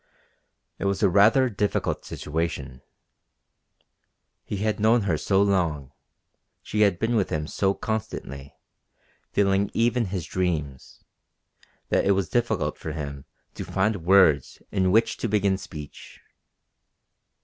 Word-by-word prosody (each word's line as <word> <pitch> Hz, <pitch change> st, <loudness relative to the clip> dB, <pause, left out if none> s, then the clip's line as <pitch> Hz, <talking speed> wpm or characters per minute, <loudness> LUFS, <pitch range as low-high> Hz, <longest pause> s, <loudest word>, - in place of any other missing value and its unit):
It -, -, -3 dB
was 100 Hz, +1 st, 0 dB
a 100 Hz, -, +5 dB
rather 110 Hz, +7 st, +5 dB
difficult 105 Hz, -3 st, -2 dB
situation. 75 Hz, -5 st, -4 dB, 1.6 s
He 105 Hz, -, -5 dB
had 105 Hz, +2 st, -1 dB
known 110 Hz, +1 st, +3 dB
her 90 Hz, -5 st, +1 dB
so 95 Hz, +5 st, +2 dB
long, 85 Hz, -9 st, 0 dB, 0.7 s
she 105 Hz, -, -2 dB
had 100 Hz, -4 st, +4 dB
been 115 Hz, +4 st, 0 dB
with 105 Hz, -4 st, +1 dB
him 75 Hz, -1 st, -2 dB
so 95 Hz, +5 st, 0 dB
constantly, 70 Hz, -11 st, -5 dB, 0.8 s
filling 100 Hz, 0 st, +2 dB
even 120 Hz, +1 st, +2 dB
his 95 Hz, -3 st, -4 dB
dreams, 75 Hz, -8 st, -3 dB, 0.9 s
that -, -, +2 dB
it 100 Hz, -, +3 dB
was 95 Hz, -3 st, -1 dB
difficult 110 Hz, -11 st, -1 dB
for 80 Hz, -, -5 dB
him 70 Hz, -3 st, -6 dB, 0.3 s
to -, -, -6 dB
find 105 Hz, +2 st, 0 dB
words 85 Hz, -7 st, +4 dB
in 95 Hz, -2 st, +1 dB
which 115 Hz, +3 st, +2 dB
to -, -, -2 dB
begin 100 Hz, -2 st, +1 dB
speech. 75 Hz, -5 st, -10 dB
95 Hz, 125 wpm, -25 LUFS, 80-105 Hz, 1.6 s, a